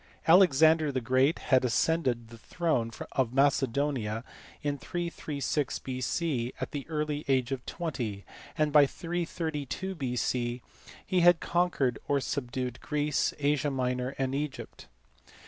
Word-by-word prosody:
Alexander 160 -3 +6
the 130 - -1
Great 130 +5 +2 0.2
had 130 - +6
as 120 -2 +1
cended 130 -9 +1
the 115 - -11
throne 155 -6 -1 0.2
of 130 -2 0
Macedonia 135 -4 +1 0.4
in 145 -1 -1
336 155 -5 -2
B.C. 130 0 -2
at - - -4
the 140 -2 -5
early 150 -1 -2
age 130 -2 +1
of 130 -2 -3
20, 125 - -4 0.3
and 155 -2 +1
by 145 -2 +7
332 170 0 -3
B.C. 125 -4 -2 0.4
he 185 - +1
had 175 -1 +6
conquered 170 -9 0
or 140 - +2
subdued 125 -2 -3
Greece, 150 -1 0
Asia 145 0 +1
Minor, 125 -1 -2
and 135 -1 -1
Egypt. 145 0 -5
140 Hz, 130 wpm, -29 LUFS, 125-155 Hz, 0.4 s, by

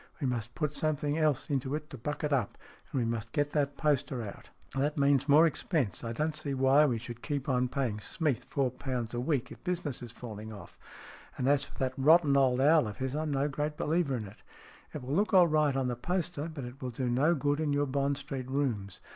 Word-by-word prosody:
We 145 - -2
must 120 -2 -2
put 150 -3 -1
something 150 0 0
else 150 -3 +1
into 140 -2 -1
it 150 0 -6
to 135 - -7
buck 150 +7 -4
it 150 -1 +1
up, 125 -7 0 0.3
and - - -2
we 120 - +1
must 115 -1 -3
get 145 0 +1
that 145 -2 0
poster 140 -5 0
out." 100 - -9 0.3
"That 145 +3 0
means 140 0 +3
more 155 +4 +7
expense. 150 - -1
I 115 - -3
don't 155 +6 -1
see 145 -2 -3
why 135 +1 +4
SMEATH 150 - +7
39 - - +2
we 120 - 0
should 120 +1 -8
keep 145 -3 -3
on 125 -2 +2
paying 125 -5 -2
Smeath 130 - -1
four 135 -3 0
pounds 125 -3 -4
a 120 - -1
week 135 0 -1
if - - -12
business 170 -7 -2
is 120 -2 -7
falling 110 -3 -8
off. 105 - -11 0.6
And 125 - 0
as 140 0 +3
for - - -15
that 130 -1 -1
rotten 150 +1 +5
old 130 -2 +4
owl 150 -2 +5
of 105 - -6
his, 130 +1 -2
I'm 155 0 -1
no 140 0 +1
great 150 +1 -3
believer 155 -3 +1
in 110 -3 -4
it. 100 +1 -13 0.5
It 145 - -6
will 130 +3 -3
look 200 +4 +2
all 180 -2 +8
right 155 -3 +2
on 135 -1 0
the 125 - -1
poster, 170 +2 -2
but 140 -5 -6
it 125 +2 -10
will 130 - -3
do 125 +1 -3
no 140 +8 +3
good 145 0 0
in 155 -2 0
your 145 0 +2
Bond 140 +1 0
Street 135 -2 -5
rooms. 120 -9 -2
140 Hz, 240 wpm, -30 LUFS, 125-150 Hz, 0.6 s, all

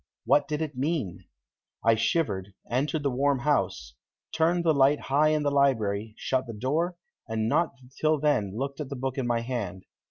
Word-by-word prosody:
What 145 - +4
did 150 +1 -1
it 150 -2 -5
mean? 135 - -2 0.6
I 115 - +6
shivered, 105 - 0 0.2
entered 145 +5 0
the 140 - +1
warm 140 +2 +2
house, 135 - 0 0.4
turned 170 +2 +2
the 160 - +5
light 140 +1 +4
high 145 +3 +2
in 155 -1 +2
the 145 - +1
library, 110 -7 +1
shut 130 -1 -1
the 115 - -6
door, 155 +11 -1 0.3
and 110 -1 -1
not 160 +5 +1 0.2
till 155 -1 +2
then 110 -9 +1
looked 140 +2 -3
at 140 - -5
the 140 - -4
book 130 +1 -3
in 125 - -1
my 120 -1 +1
hand. 115 -6 -4
135 Hz, 185 wpm, -27 LUFS, 115-150 Hz, 0.6 s, I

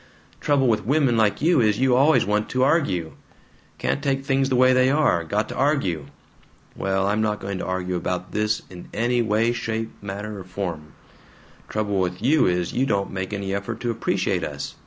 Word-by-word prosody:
Trouble 140 -2 +2
with 110 -2 +1
women 135 -1 +2
like 110 +3 +1
you 165 -4 +4
is, 105 -2 +2
you 130 -1 +3
always 145 +5 +4
want 105 +1 0
to 130 0 +1
ARGUE. 115 - +1 0.7
Can't - - -1
take 135 -1 0
things 135 0 +1
the 130 - +1
way 130 +1 +5
they 130 0 +4
are. 140 - +2
Got 105 +6 -1
to - - -6
argue. 115 - 0 0.7
Well, 95 0 0
I'm 105 +2 +1
not 105 -1 0
going 95 -1 -4
to - - -4
argue 95 0 -2
about 90 +1 -3
this 105 0 0
in 90 -1 -10
any 120 +2 +1
way, 110 +1 +2
shape, 115 -1 -3
manner, 100 +1 -6
or - - -7
form. 90 -5 -5 0.8
Trouble 105 -2 -1
with 90 0 -1
you 140 +6 +3
is, 90 -1 0
you 130 +2 +1
don't 100 -3 0
make 95 0 -4
any 100 -1 -3
effort 100 0 -4
to 120 - 0
appreciate 115 - -1
us. - - -5
105 Hz, 195 wpm, -23 LUFS, 95-130 Hz, 0.8 s, way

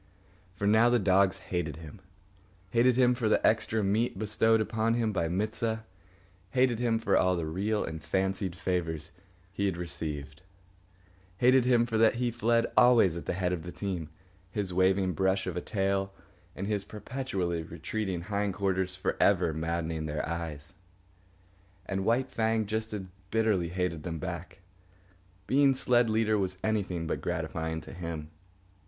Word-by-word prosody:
For 100 - -3
now 110 +3 +5
the 120 - +4
dogs 95 -1 +3
hated 90 -4 -3
him—hated 95 +6 -3
him 125 -1 +4
for 120 -3 0
the - - +2
extra 110 0 +2
meat 105 +3 +1
bestowed 110 +2 +2
upon 110 +1 0
him 115 -3 0
by 85 -3 0
Mit 100 +6 -1
sah; 110 -1 -1 0.7
hated 125 -1 +2
him 120 -2 +2
for 110 - +1
all 90 0 +3
the 85 -2 -2
real 100 +7 -1
and 80 -1 -6
fancied 95 0 -1
favours 85 -4 -2 0.4
he 100 0 0
received; 75 -5 -5 1.0
hated 125 +2 +5
him 120 -2 +4
for 115 -2 -1
that 115 0 +5
he 120 0 0
fled 115 0 +2
always 120 -8 +6
at 85 - -7
the - - 0
head 90 -1 0
of 85 - -3
the 90 - -7
team, 90 -6 -4 0.4
his 95 -1 -3
waving 95 0 +2
brush 95 +3 +1
of 90 -2 -3
a 90 - -2
tail 95 0 -1 0.4
and 95 - -4
his 105 -1 -1
perpetually 100 -6 -3
retreating 85 +3 -4
hind 100 0 -2
quarters 95 -2 0
for 95 - -2
ever 90 -5 +3
maddening 80 0 -2
their 75 0 -3
eyes. 80 -3 -5 1.1
And 95 0 -2
White 125 +4 +1
Fang 110 -1 +1
just 110 +2 -3
as 105 -2 -4 0.3
bitterly 105 -6 +1
hated 90 -3 -2
them 85 0 -4
back. 90 +3 -6 0.8
Being 135 0 +4
sled 120 -2 +3
leader 110 -1 +2
was 95 -1 -2
anything 100 -6 -1
but 80 - -2
gratifying 80 0 -3
to - - -11
him. 85 -4 -6
95 Hz, 160 wpm, -29 LUFS, 85-110 Hz, 1.1 s, always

